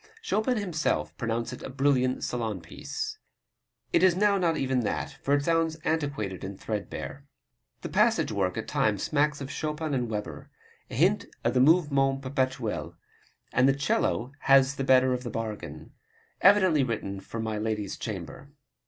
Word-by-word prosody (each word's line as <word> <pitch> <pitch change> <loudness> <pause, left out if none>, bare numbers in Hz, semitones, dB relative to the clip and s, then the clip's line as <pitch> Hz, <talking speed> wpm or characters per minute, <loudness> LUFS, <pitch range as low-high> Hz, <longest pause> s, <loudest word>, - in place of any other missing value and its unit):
Chopin 250 - +1
himself 175 -7 -1
pronounced 115 0 -2
it - - -9
a - - -6
brilliant 130 -1 +1
salon 115 -5 -2
piece. - - -6 0.7
It - - +4
is 185 -2 +5
now 205 +1 +3
not 170 -3 +1
even 130 -1 +1
that, 115 - -2
for 140 - +2
it 145 - 0
sounds 165 -1 +2
antiquated 140 - -2
and 95 0 -6
threadbare. 115 +6 -5 0.6
The - - -4
passage - - +2
work 95 -2 -1
at 110 - -4
times 105 -3 +1
smacks 150 -1 +1
of 135 - -5
Chopin 155 0 -3
and 125 -3 -1
Weber 105 -1 -5 0.4
a - - -7
hint - - +2 0.2
of 120 - +1
the 130 - +3
Mouvement 135 -3 +3
Perpetuel 130 - -2 0.6
and 130 +2 +4
the 135 - +3
'cello 140 - 0
has 135 0 +5
the 135 - -1
better 130 -1 +4
of 125 - -2
the 120 - -4
bargain. 105 -9 -6 0.5
Evidently 185 -7 +5
written 105 -5 -3
for 115 +4 -7
my 110 -1 -2
lady's 105 -2 -2
chamber. 105 +6 -7
130 Hz, 160 wpm, -28 LUFS, 110-150 Hz, 0.7 s, is